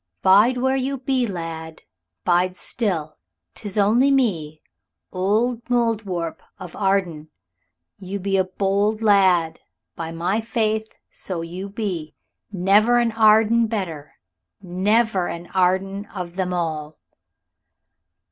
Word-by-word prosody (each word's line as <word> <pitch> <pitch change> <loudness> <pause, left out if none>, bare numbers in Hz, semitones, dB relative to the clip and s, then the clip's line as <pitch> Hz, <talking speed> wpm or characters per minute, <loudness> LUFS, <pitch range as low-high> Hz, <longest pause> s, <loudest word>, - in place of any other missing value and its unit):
"Bide 210 +7 +5
where 265 +2 +1
you 270 +1 -1
be, 255 -1 0
lad, 165 -4 -6 0.4
bide 180 +1 +2
still; 175 -7 -3 0.3
'tis 205 -2 -7
only 225 +7 +4
me 170 - 0 0.5
old 220 +6 0
Mouldiwarp 220 -8 -1 0.2
of 185 -4 -10
Arden. 185 -6 -1 0.7
You 195 +1 -5
be 195 +1 -1
a 190 - +3
bold 200 +3 0
lad, 185 -6 +3 0.4
by 165 -1 -5
my 180 +6 -1
faith, 220 -1 -2
so 180 -3 -5
you 180 +4 -6
be. 185 -8 -4 0.4
Never 205 +5 +3
an 235 -1 +2
Arden 225 +1 +4
better. 170 -10 -5 0.5
Never 195 +1 +1
an 170 +1 -6
Arden 190 +2 0
of 180 -4 -7
them 185 -1 -2
all." 155 -3 -3
195 Hz, 115 wpm, -22 LUFS, 175-220 Hz, 0.7 s, Bide